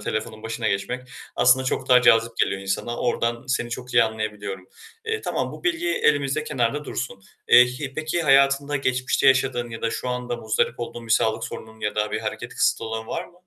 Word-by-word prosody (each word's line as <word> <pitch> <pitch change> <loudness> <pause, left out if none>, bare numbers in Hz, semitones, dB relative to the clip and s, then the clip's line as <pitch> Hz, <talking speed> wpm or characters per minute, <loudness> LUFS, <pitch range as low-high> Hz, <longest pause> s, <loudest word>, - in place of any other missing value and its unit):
telefonun 110 +1 -4
başına 115 0 -2
geçmek 125 +6 -3 0.3
aslında 130 +1 +4
çok - - -2
daha 125 -1 +6
cazip 115 -1 +4
geliyor 95 - 0
insana. 95 +5 -3
Oradan 120 0 -1
seni 120 -2 -1
çok 125 +1 -6
iyi - - +7
anlayabiliyorum. 105 -4 -5 0.4
Eee, 445 -1 -2
tamam, - - -2
bu - - -11
bilgi 345 -1 0
elimizde 145 - +1
kenarda 135 +1 -1
dursun. 105 -9 -5 0.3
Eee, 125 - +9
hi 130 +2 -6
peki 155 +3 -2
hayatında 140 0 +4
geçmişte 130 -1 0
yaşadığın 130 -2 +2
ya 115 - -8
da 115 - 0
şu 125 - -4
anda 125 -1 -3
muzdarip 115 +1 -1
olduğun 120 0 -6
bir 110 - +1
sağlık 110 -1 +2
sorununun 110 0 -9
ya 105 - -2
da 105 0 0
bir - - -2
hareket - - -5
kısıtı - - +1
olan 110 0 -4
var 170 +9 -3
mı? - - -18
120 Hz, 195 wpm, -23 LUFS, 110-135 Hz, 0.4 s, Eee